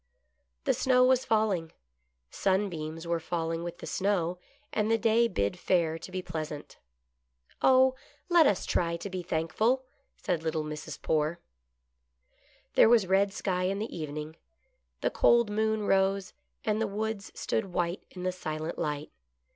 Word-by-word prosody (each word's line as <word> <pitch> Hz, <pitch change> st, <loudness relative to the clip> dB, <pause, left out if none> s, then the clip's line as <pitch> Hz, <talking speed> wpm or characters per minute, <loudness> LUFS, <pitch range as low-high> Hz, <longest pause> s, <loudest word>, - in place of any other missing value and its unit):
The -, -, +2 dB
snow 250 Hz, -1 st, +4 dB
was 255 Hz, 0 st, +3 dB
falling. 205 Hz, -7 st, +1 dB, 0.6 s
Sunbeams 170 Hz, -5 st, -1 dB
were 170 Hz, 0 st, 0 dB
falling 165 Hz, 0 st, -2 dB
with 175 Hz, 0 st, -5 dB
the -, -, -9 dB
snow, 180 Hz, -3 st, 0 dB, 0.3 s
and 215 Hz, 0 st, +1 dB
the 225 Hz, -, +4 dB
day 225 Hz, +1 st, +3 dB
bid 100 Hz, -, -1 dB
fair 165 Hz, -3 st, +1 dB
to 185 Hz, -, -9 dB
be 185 Hz, 0 st, -3 dB
pleasant. 155 Hz, -3 st, -6 dB, 0.4 s
" 60 Hz, 0 st, -36 dB
Oh! 260 Hz, 0 st, +6 dB, 0.3 s
let 345 Hz, -4 st, +6 dB
us 200 Hz, -, +1 dB
try 170 Hz, -1 st, 0 dB
to 195 Hz, +3 st, -7 dB
be 185 Hz, -1 st, -3 dB
thankful," 185 Hz, +10 st, 0 dB, 0.3 s
said 175 Hz, -5 st, -1 dB
little 160 Hz, -1 st, -1 dB
Mrs. 150 Hz, 0 st, -6 dB
Poore. 155 Hz, +2 st, 0 dB, 1.3 s
There -, -, +6 dB
was 230 Hz, -4 st, +5 dB
red 195 Hz, +2 st, +3 dB
sky 185 Hz, -2 st, -1 dB
in 195 Hz, +1 st, 0 dB
the 220 Hz, +3 st, -4 dB
evening. 155 Hz, 0 st, -5 dB, 0.6 s
The -, -, +1 dB
cold 235 Hz, -3 st, +4 dB
moon 220 Hz, 0 st, 0 dB
rose, 195 Hz, 0 st, +2 dB, 0.3 s
and 215 Hz, 0 st, +1 dB
the 220 Hz, -, +1 dB
woods 210 Hz, 0 st, -3 dB
stood 220 Hz, -, 0 dB
white 175 Hz, -1 st, -2 dB
in 180 Hz, -, -8 dB
the 185 Hz, -, +1 dB
silent 160 Hz, -2 st, -4 dB
light. 150 Hz, 0 st, -3 dB
185 Hz, 155 wpm, -29 LUFS, 165-215 Hz, 1.3 s, Oh